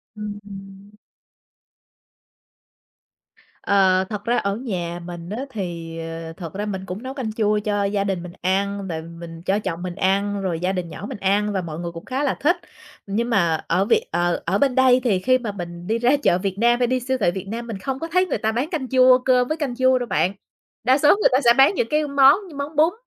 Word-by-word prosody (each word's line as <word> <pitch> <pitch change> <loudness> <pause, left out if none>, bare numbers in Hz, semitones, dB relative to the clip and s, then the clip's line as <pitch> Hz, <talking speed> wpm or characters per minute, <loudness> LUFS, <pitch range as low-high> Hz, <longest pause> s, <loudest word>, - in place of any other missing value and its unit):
Ừm, 210 -1 -6
ừm. 195 0 -11 2.7
Ờ, 190 -2 +3
thật 210 -2 -5
ra 240 +1 +2
ở 200 0 0
nhà 175 -8 -4
mình 175 0 -8
á 245 +6 -4
thì, 170 -6 -5
ờ, 165 0 -6
thật 165 -2 -8
ra 205 +2 -3
mình 190 -2 -4
cũng 190 +7 -6
nấu 260 +1 -5
canh 245 -6 -4
chua 210 -1 +1
cho 205 -1 -1
gia 200 0 0
đình 190 -3 -2
mình 175 - -9
ăn, 195 +1 -1
rồi 160 -2 -4
mình 165 0 -10
cho 200 +2 +1
chồng 175 -4 -4
mình 180 -1 -5
ăn, 200 +1 0
rồi 175 -4 -2
gia 180 +2 0
đình 180 -3 -3
nhỏ 185 - -8
mình - - -6
ăn 205 +2 +1
và 190 - 0
mọi 165 -2 -6
người 170 -1 -4
cũng 165 0 -10
khá 265 +3 -2
là 275 - +1
thích. 320 +6 +3 0.5
Nhưng 230 +5 -1
mà 170 -8 +1
ở 185 +4 +2
Việt 445 - +3
ờ, 175 0 0
ở 190 +4 +1
bên 270 0 +2
đây 255 -1 +5
thì 210 -7 +2
khi 255 +6 +3
mà 230 -5 -4
mình 175 -2 -8
đi 225 - +1
ra 240 +2 +3
chợ 175 - +4
Việt 190 0 -3
Nam 240 +2 +3
hay 245 - +2
đi 255 +1 +1
siêu 260 +2 -1
thị 175 -5 +2
Việt 190 +2 -6
Nam 230 +3 -5
mình 225 -4 -5
không 265 +7 -4
có 330 - -4
thấy 365 +2 +2
người - - -2
ta 220 -1 0
bán 250 +7 -2
canh 295 -8 -3
chua, 255 -1 +6
cơm 250 -1 +3
với 310 +3 -2
canh 275 -5 -3
chua 260 0 +3
đâu 245 - -4
bạn. 190 -1 +1 0.5
Đa 255 +3 +4
số 295 +1 +4
người 420 - +3
ta 255 - +4
sẽ 235 - +7
bán 270 +8 +6
những 230 - 0
cái 300 0 +1
món 280 0 +6 0.2
món 285 +2 -5
bún 315 +4 +4
205 Hz, 235 wpm, -22 LUFS, 185-255 Hz, 2.7 s, sẽ